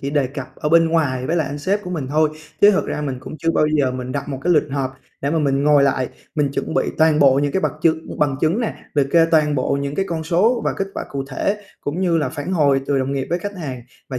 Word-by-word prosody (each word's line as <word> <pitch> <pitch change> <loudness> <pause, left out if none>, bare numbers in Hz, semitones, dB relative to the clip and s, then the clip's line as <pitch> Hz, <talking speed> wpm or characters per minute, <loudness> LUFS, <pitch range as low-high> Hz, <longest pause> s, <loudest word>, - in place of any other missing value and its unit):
chỉ 140 - -3
đề 145 -2 +1
cập 135 0 -8
ở 150 - -2
bên 165 +1 +5
ngoài 140 -6 0
với 165 +4 0
lại 155 - +1
anh 145 - -5
sếp 195 +8 -1
của 180 - -7
mình 155 -7 -3
thôi, 155 +2 +2 0.3
chứ 205 - +8
thực 195 - 0
ra - - -3
mình 135 -3 -3
cũng 155 - -8
chưa 165 +4 +1
bao 155 - +2
giờ 150 -4 +1
mình 125 0 -5
đặt 140 0 -4
một 135 -2 -4
cái 175 - +3
lịch 150 -2 +2
họp 135 -1 -2 0.3
để 140 - -1
mà 165 - +1
mình 140 -2 +1
ngồi 145 -1 +5
lại, 130 -2 +1 0.3
mình 150 -3 +1
chuẩn 160 - -3
bị - - +1
toàn 160 -1 +4
bộ 140 -3 +6
những 145 0 0
cái 190 - +1
bật - - +1
chứng 160 -1 0
bằng 145 -3 +1
chứng 165 +8 +1
nè, 230 - -2 0.2
liệt 145 -3 +3
kê 165 +1 +5
toàn 155 -2 +3
bộ 140 +1 0
những 140 0 -3
cái 195 - 0
con 160 -2 -3
số 210 +9 +2
và - - +1
kết 195 - -3
quả - - -4
cụ 135 -1 -3
thể, 200 +9 -2 0.2
cũng 150 +5 -3
như 175 -3 +2
là 145 -4 0
phản 145 +5 -5
hồi 140 -6 +3
từ 140 -1 +1
đồng 130 +1 -1
nghiệp 135 -1 -2
với 175 - +1
khách 205 +3 -6
hàng 135 -8 -6 0.3
và 130 - -4
150 Hz, 290 wpm, -20 LUFS, 140-165 Hz, 0.3 s, chứ